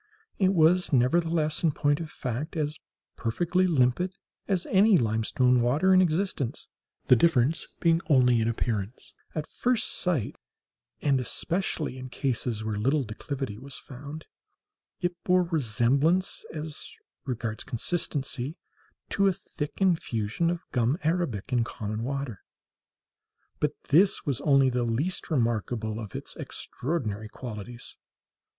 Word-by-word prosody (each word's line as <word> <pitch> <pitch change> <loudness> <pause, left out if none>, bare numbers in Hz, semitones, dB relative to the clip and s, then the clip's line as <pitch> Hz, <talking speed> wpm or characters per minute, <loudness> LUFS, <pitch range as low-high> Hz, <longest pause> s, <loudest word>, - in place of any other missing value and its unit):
It 190 -1 +3
was, 175 +2 +4
nevertheless, 155 +4 +2
in 160 -4 +2
point 145 +1 +1
of 165 -2 -5
fact, 135 +7 -4
as 150 0 -2 0.4
perfectly 175 +10 +1
limpid 165 +5 +2 0.3
as 190 -3 0
any 200 +1 +6
limestone 120 +2 +2
water 145 +11 +3
in 185 - +7
existence, 170 - -1 0.4
the 125 - +7
difference 145 +1 +2
being 165 -1 +3
only 125 -5 +5
in 110 - +1
appearance. 110 -2 -3 0.2
At 155 -1 -2
first 245 +4 0
sight, 170 - -1 0.7
and 140 -3 +3
especially 155 0 -2
in 130 0 -7
cases 120 -4 -2
where 110 -1 -2
little 135 +7 +2
declivity 125 0 -5
was 135 +1 -9
found, 145 +4 -9 0.8
it 175 -1 -2
bore 180 0 +4
resemblance, 145 - +1
as 155 -1 -5 0.3
regards 120 -4 -3
consistency, 140 - -2 0.5
to 200 0 +3
a 190 - +3
thick 150 -3 -6
infusion 165 - +1
of 175 -1 -2
gum 125 +4 +2
arabic 155 - -1
in 120 -2 +3
common 110 -1 -4
water. 135 -5 -3 1.2
But 150 0 +1 0.2
this 185 +7 +4
was 135 -5 -1
only 135 -2 +4
the 125 0 0
least 120 +10 -1
remarkable 115 -5 0
of 105 -4 -7
its - - -5
extraordinary 110 -8 -3
qualities. 120 0 -8
140 Hz, 130 wpm, -27 LUFS, 120-170 Hz, 1.2 s, in